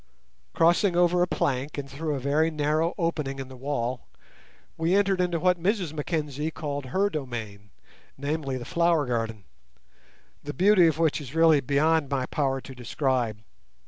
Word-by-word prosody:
Crossing 175 +3 +3
over 175 0 +3
a 180 - +3
plank 140 -2 -1
and 140 -1 -4
through 150 +2 -3
a - - -3
very 145 +5 +2
narrow 155 +2 0
opening 155 -6 -2
in 135 -1 -6
the 130 - -10
wall, 130 -2 -3 0.7
we 165 +3 +1
entered 195 -2 +2
into 175 -2 0
what 180 0 +2
Mrs 185 -4 0
Mackenzie 150 -1 -2
called 145 -3 -5
her 190 +9 +1
domain—namely, 135 - -6
the 120 - -7
flower 170 -1 +2
garden, 115 -4 -3 1.0
the 145 +1 -6
beauty 185 -1 +5
of 160 -2 +1
which 160 -2 +1
is 140 +1 -9
really 165 -3 +5
beyond 145 +3 +2
my 135 -2 -1
power 135 -1 -1
to 135 - -10
describe. 125 -3 -1
150 Hz, 155 wpm, -26 LUFS, 135-165 Hz, 1.0 s, beauty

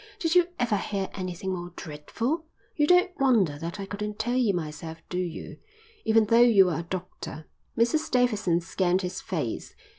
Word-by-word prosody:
"Did 330 -1 0
you 355 -1 +5
ever 235 -4 +1
hear 195 -1 -3
anything 185 0 -4
more 175 -1 -6
dreadful? 230 - -3 0.3
You 295 -1 +2
don't 360 +1 +5
wonder 215 - +3
that 170 +5 -5
I 195 - -3
couldn't 210 +1 -5
tell 240 +3 -1
you 245 -5 +3
myself, 160 -2 -5
do 180 - -2
you? 175 -3 -5 0.5
Even 220 0 +5
though 230 +3 +4
you 205 -7 +6
are 160 - -1
a 170 0 -7
doctor." 170 -3 -6 0.3
Mrs 305 +8 +2
Davidson 215 - +2
scanned 185 +2 0
his 180 +1 -4
face. 155 - -4
195 Hz, 175 wpm, -27 LUFS, 175-240 Hz, 0.5 s, you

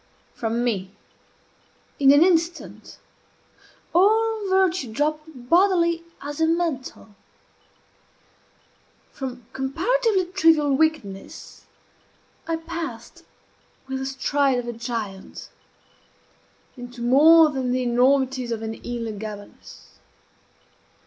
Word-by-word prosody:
From 230 +1 -2
me, 195 -5 -2 1.0
in 275 -1 +6
an 285 +3 +6
instant, 345 -1 -1 1.0
all 430 +3 +2
virtue 370 -9 +1
dropped 305 +5 -1 0.2
bodily 340 -1 +3 0.2
as 290 +2 -5
a 320 - +4
mantle. 320 -10 -3 2.0
From 250 -3 -7
comparatively 380 - 0
trivial 325 -6 +3
wickedness 270 -11 -3 0.8
I 330 - 0
passed, 325 -7 -7 0.6
with 265 0 -4
the 265 - -4
stride 275 0 0
of 245 -1 -4
a 240 - -4
giant, 225 -4 -6 1.3
into 245 -1 -9
more 305 +5 +6
than 260 -3 -2
the 255 0 0
enormities 255 0 +1
of 225 -1 -3
an 220 0 -4
Elah 235 -2 -4
Gabalus. 210 -1 -11
275 Hz, 95 wpm, -23 LUFS, 240-335 Hz, 2.0 s, in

